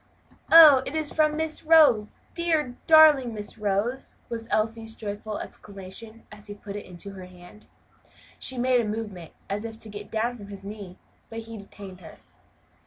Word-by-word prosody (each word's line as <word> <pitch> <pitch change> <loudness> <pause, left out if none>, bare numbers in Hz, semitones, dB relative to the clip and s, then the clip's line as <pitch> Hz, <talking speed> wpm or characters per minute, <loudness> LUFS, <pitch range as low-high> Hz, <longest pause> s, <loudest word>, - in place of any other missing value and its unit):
"Oh! 310 -5 +9
it 285 - -5
is 310 -2 -2
from 305 -1 +2
Miss 320 0 -3
Rose! 305 -10 +5 0.2
dear, 320 -7 -1
darling 300 -7 +6
Miss 210 +1 -8
Rose!" 210 +5 -2
was 230 -1 -5
Elsie's 225 +1 -2
joyful 210 0 -6
exclamation, 205 +3 -10
as 210 0 -14
he 205 - -8
put 205 0 -9
it 205 - -7
in 180 -1 -12 0.2
her 190 -1 -10
hand. 180 +3 -16 0.7
She 260 - -2
made 250 0 +2
a - - -3
movement 210 -6 -6 0.2
as 205 +2 -3
if 225 -1 -7
to 225 - -10
get 205 0 -9
down 235 +2 -2
from 205 -3 -11
his 200 -1 -10
knee, 200 -3 -9 0.3
but 225 0 -6
he 225 0 -10
detained 200 -2 -11
her. 160 - -13
220 Hz, 175 wpm, -25 LUFS, 205-255 Hz, 0.7 s, Oh